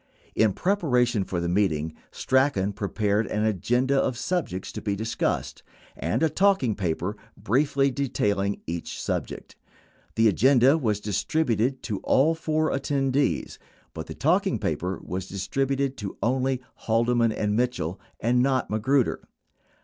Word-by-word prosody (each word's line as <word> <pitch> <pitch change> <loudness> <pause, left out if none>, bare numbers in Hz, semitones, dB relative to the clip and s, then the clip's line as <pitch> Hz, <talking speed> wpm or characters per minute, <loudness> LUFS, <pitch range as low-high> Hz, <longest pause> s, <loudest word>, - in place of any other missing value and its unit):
21 - - +3
In - - -4
preparation 125 - +1
for 90 -2 -3
the 85 - -2
meeting, 85 -4 0 0.2
Strachan 130 -7 +1
prepared 105 +1 0
an 105 +1 -1
agenda 120 +6 +1
of 130 -3 -1
sub 175 +5 -1
jects 90 +1 -6
to - - -6
be 100 -2 -1
discussed 110 +3 -2 0.3
and - - -1
a - - +5
talking 190 - +2
paper 95 +1 -2 0.2
briefly 140 +3 +1
detailing 100 -7 -1
each 85 +1 -5
subject; - - -4 0.6
the 115 0 +4
agenda 130 - +5
was 110 -10 0
distributed 120 - 0
to 105 -5 -3
all 150 +5 +3
four 155 -1 0
attendees, 135 0 0 0.3
but 80 -1 -6
the - - -7
talking 180 - +2
paper 90 +4 -2
was 95 +1 -5
distributed 135 +8 -1
to 100 -3 -6
only 130 +1 0 0.2
Haldeman 115 0 +2
and 105 -1 -1
Mitchell 110 -8 -1 0.2
and 125 +2 +2
not 130 -2 +1
Magruder. 125 +4 +1
120 Hz, 140 wpm, -25 LUFS, 100-135 Hz, 0.6 s, a